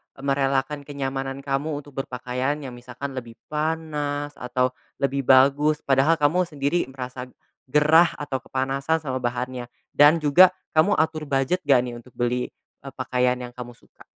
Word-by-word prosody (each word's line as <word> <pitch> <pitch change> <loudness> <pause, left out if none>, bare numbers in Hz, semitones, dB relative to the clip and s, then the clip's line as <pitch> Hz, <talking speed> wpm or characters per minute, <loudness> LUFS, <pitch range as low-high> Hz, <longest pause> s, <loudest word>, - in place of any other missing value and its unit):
merelakan 135 +1 -1
kenyamanan 135 -1 -4
kamu 145 +1 -2
untuk 145 - -15
berpakaian 125 +2 -2
yang 130 - -6
misalkan 125 +3 -7
lebih 120 -2 -6 0.2
panas 150 -2 -2
atau 125 +1 0 0.3
lebih 140 -1 -1
bagus, 140 +3 +4
padahal 140 +4 +3
kamu 165 +4 +2
sendiri 145 +1 -1
merasa 130 -1 -7 0.4
gerah 155 +5 +4
atau 135 -3 -4
kepanasan 135 +4 -1
sama 130 -2 -2
bahannya, 125 0 -3 0.2
dan 145 +3 +6
juga, 180 +6 +6 0.2
kamu 160 +6 +4
atur 155 -1 0
budget 135 +7 +1
nggak 135 -3 +6
nih 120 - -6
untuk 125 +1 -18
beli, 125 +1 0 0.3
eee, 135 0 -9
pakaian 125 -1 +1
yang 125 -1 -7
kamu 120 -1 -9
suka? - - -21
135 Hz, 150 wpm, -24 LUFS, 125-150 Hz, 0.4 s, dan